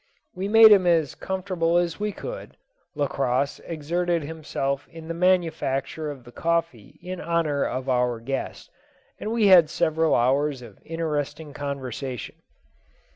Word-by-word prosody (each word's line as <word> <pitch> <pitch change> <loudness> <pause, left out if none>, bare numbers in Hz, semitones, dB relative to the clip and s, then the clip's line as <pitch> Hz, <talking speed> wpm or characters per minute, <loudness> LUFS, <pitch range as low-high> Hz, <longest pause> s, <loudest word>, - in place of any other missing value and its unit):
We 190 +2 -3
made 220 +1 +8
him 190 -3 +6
as 165 -4 +2
comfortable 185 -3 -1
as 175 0 0
we 210 0 -1
could; - - -8 0.4
Lacosse 135 -1 0
exerted 170 +1 -1
himself 145 -3 -3
in 165 -1 -11
the 165 - -3
manufacture 160 -5 0
of 140 -4 -8
the 120 - -14
coffee 165 -8 -2
in 185 0 -6
honour 160 -3 0
of 130 +1 -3
our 125 -2 +1
guest, 135 +4 -5 0.5
and 215 - -4
we 230 -2 +2
had 180 -5 +7
several 160 0 +1
hours 135 +2 +1
of 110 -4 -13
interesting 150 -2 -3
conversation. 135 -4 -5
160 Hz, 135 wpm, -25 LUFS, 135-175 Hz, 0.5 s, made